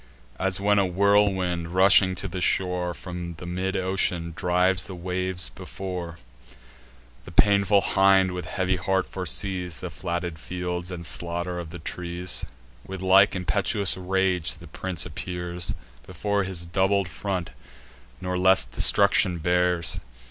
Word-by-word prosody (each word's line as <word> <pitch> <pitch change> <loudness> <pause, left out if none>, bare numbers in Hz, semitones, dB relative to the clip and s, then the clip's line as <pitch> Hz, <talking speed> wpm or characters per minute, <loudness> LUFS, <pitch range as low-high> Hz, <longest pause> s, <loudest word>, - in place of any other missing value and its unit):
As 95 0 0
when 100 +1 +3
a 100 - +3
whirlwind, 95 -3 +1
rushing 95 0 +5
to 100 - -4
the 90 0 -5
shore 90 -1 +1
From 90 -2 -7
the 90 - -9
mid 95 +2 -3
ocean, 90 -3 0
drives 90 +2 +1
the 95 - -7
waves 90 0 -3
before; 90 -2 -7 1.1
The - - -10
painful 100 +2 +4
hind 95 -1 +4
with 90 -2 -5
heavy 95 +2 -1
heart 95 +1 0
foresees 90 0 -2
The - - -6
flatted 85 -2 -4
fields, 90 0 -4
and 85 -2 -6
slaughter 85 +1 -3
of 85 -2 -7
the 85 - -8
trees; 85 +2 -3 0.4
With 95 -1 -7
like 95 +2 +5
impetuous 100 +2 +1
rage 95 -2 0
the 85 0 -14
prince 90 +1 -1
appears 90 0 -4 0.3
Before 100 +2 -1
his 90 -2 -3
doubled 95 +2 +1
front, 90 0 -4 0.7
nor 90 0 -3
less 95 -6 +5
destruction 75 +7 +4
bears. 90 0 +1
90 Hz, 135 wpm, -25 LUFS, 85-95 Hz, 1.1 s, rushing